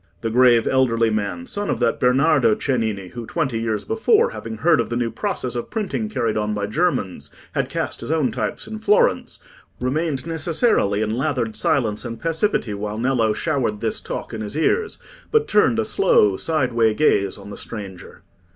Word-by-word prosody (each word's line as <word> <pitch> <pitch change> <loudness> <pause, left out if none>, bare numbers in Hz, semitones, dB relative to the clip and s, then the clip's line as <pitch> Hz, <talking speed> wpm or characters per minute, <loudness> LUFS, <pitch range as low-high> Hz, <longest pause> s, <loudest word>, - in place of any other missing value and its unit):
The 115 - -2
grave 120 -1 +5
elderly 115 -4 +2
man, 110 - -2
son 205 -5 -3
of - - -1
that 120 -2 +1
Bernardo 130 -2 +3
Cennini, 110 -8 -2
who, 120 +1 -8
twenty 135 -9 -1
years 110 -2 -2
before, 445 - +2
having 225 - -7
heard 170 -4 +3
of - - -5
the 120 - -2
new 120 -1 -1
process 175 - -3
of 120 - -4
printing 215 0 -3
carried 115 - -1
on 105 0 -1
by 105 -1 -2
Germans, 125 - -1 0.2
had - - -1
cast - - -3
his - - -7
own 155 -4 +1
types - - -3
in 220 0 -7
Florence, 465 - +2 0.4
remained 140 +2 -1
necessarily 160 - +1
in 110 - -2
lathered 125 -5 -1
silence 110 -2 0
and 115 -2 -6
passivity 165 - 0
while 105 +1 -4
Nello 120 -2 +1
showered 125 -5 -1
this - - -2
talk - - -6
in 110 - -4
his 105 +6 -5
ears, 440 - +1 0.3
but 450 0 +2
turned 210 +2 +3
a 225 - +1
slow 180 - +3
sideway 120 -6 +1
gaze 100 -10 +2
on 100 0 -11
the - - -7
stranger. 100 -5 -8
125 Hz, 180 wpm, -21 LUFS, 110-165 Hz, 0.4 s, grave